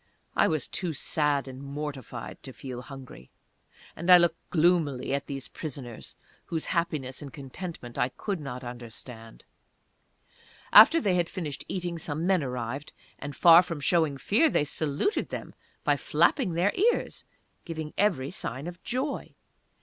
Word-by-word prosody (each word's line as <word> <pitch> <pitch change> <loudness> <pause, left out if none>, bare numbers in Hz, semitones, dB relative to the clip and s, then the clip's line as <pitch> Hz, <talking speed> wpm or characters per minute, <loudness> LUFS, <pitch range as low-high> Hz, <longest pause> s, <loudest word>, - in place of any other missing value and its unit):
I - - +4
was 155 -5 0
too 175 -3 -2
sad 145 -1 0
and 130 0 -8
mortified 140 -4 -6
to 130 - -10
feel 125 -2 -7
hungry, 130 - -11 0.7
and 170 +3 -4
I 180 - +11
looked 175 -1 +1
gloomily 160 -6 +2
at 140 0 -2
these 135 -2 -4
prisoners, 130 -7 -7 0.3
whose 160 -2 -3
happiness 155 -7 -1
and 140 -2 -8
contentment 140 -2 -7
I 125 - +2
could 195 +7 -4
not 135 -3 -6
understand. 120 -1 -10 1.3
After 330 - +10
they 200 - +1
had 175 -2 +1
finished 155 -7 -5
eating 175 -2 -3
some 155 +1 -3
men 185 -2 +3
arrived, 125 +2 -4 0.3
and 145 0 -6
far 170 0 +8
from 170 -4 -5
showing 155 -2 +2
fear, 230 - +3
they - - +2
saluted 150 - -1
them - - -6 0.3
by - - +3
flapping 240 - +2
their 175 +5 +2
ears 465 +5 +1 0.4
giving 160 -3 -5
every 175 -10 +1
sign 135 -6 -5
of 175 +1 -7
joy. 260 +5 -3
150 Hz, 150 wpm, -28 LUFS, 135-175 Hz, 1.3 s, I